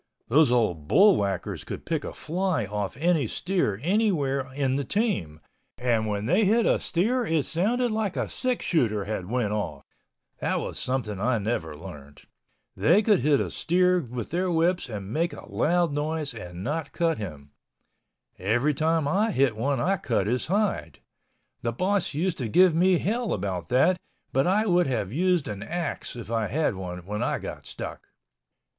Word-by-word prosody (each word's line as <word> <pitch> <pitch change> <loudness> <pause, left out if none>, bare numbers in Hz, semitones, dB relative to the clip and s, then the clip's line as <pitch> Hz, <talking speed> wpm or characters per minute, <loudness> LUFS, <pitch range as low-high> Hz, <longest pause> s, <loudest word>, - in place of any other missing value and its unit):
Those 145 +3 +5
old 90 -11 +1
bullwhackers 100 - +3
could - - -7
pick - - -1
a - - -5
fly 180 - -1
off 105 0 -4
any 160 -4 +2
steer 175 - -1
anywhere 150 - +1
in 135 -2 +1
the 140 - 0
team, 180 - -1 0.4
and 115 -3 +1
when 105 0 -2
they 180 - +3
hit 220 +3 +3
a - - +3
steer 230 +9 0
it 160 - +1
sounded 230 +8 +1
like 215 -3 -1
a - - 0
six 255 -2 -2
shooter 110 - +1
had 100 -3 -4
went 115 -4 0
off—that 105 -1 -5
was - - -4
something 120 -6 -2
I 120 +3 +1
never 100 -8 -2
learned. 75 -5 -11 0.5
They 190 +7 +4
could 210 -4 +4
hit 145 +1 +3
a - - -2
steer 180 +1 +2
with 125 -6 -6
their 180 +2 0
whips 170 -2 +1
and 105 -1 -6
make 170 +2 0
a - - -10
loud 175 0 +1
noise 150 -1 -2
and 90 -5 -8
not 150 +4 -3
cut 165 -6 0
him. 75 -8 -7 0.9
Every 120 +10 +1
time 160 +1 +1
I 205 +9 +2
hit 135 - +2
one 135 +4 0
I 195 +9 +1
cut 120 - 0
his 120 +4 -1
hide. 205 +3 0 0.6
The 115 - -1
boss 190 - 0
used 170 +2 -1
to 125 - -1
give 180 - +5
me 180 +2 +4
hell 225 +6 -1
about 95 -4 -3
that 175 - +3 0.3
but 135 +3 +2
I 210 +4 +3
would 180 -5 +3
have 110 -6 -2
used 180 0 +2
an 100 -2 -5
axe 170 +4 -3
if 115 -2 -8
I 115 -2 0
had 150 +4 0
one 90 -2 -6
when 105 +2 -3
I - - 0
got - - -7
stuck. - - -7
140 Hz, 175 wpm, -26 LUFS, 105-180 Hz, 0.9 s, Those